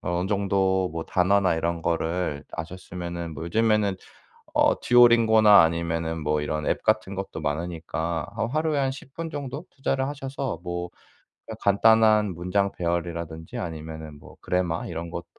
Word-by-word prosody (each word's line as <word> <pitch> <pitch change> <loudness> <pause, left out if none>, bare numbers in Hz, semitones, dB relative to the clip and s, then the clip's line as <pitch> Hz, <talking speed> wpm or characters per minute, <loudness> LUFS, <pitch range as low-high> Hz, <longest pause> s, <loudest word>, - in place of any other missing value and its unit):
어느 90 0 -1
정도 95 -2 +1
뭐 80 0 -4
단어나 95 0 +2
이런 85 0 -2
거를 85 -2 -1
아셨으면은 85 -1 -6
뭐 80 - -6
요즘에는 105 +1 +2 0.6
어 - - +3
듀오링고나 115 -4 +6
아니면은 80 0 -1
뭐 75 0 0
이런 75 0 -2
앱 - - 0
같은 110 -3 +1
것도 95 -4 -5
많으니까 80 +1 -3
한 115 - -1
하루에 155 +1 0
한 135 -1 +1
10 135 0 -12
분 165 -1 -5
정도? 145 +1 -5
투자를 135 -1 -1
하셔서 135 - -4
뭐 90 0 -4 0.6
그냥 110 -1 -8
간단한 110 0 +4
문장 95 +3 0
배열이라든지 85 -2 -3
아니면은 80 -2 -6
뭐 - - -15
그래머 90 -2 -1
이런 85 +1 -5
것도 85 0 -5
90 Hz, 330 characters per minute, -25 LUFS, 80-110 Hz, 0.6 s, 듀오링고나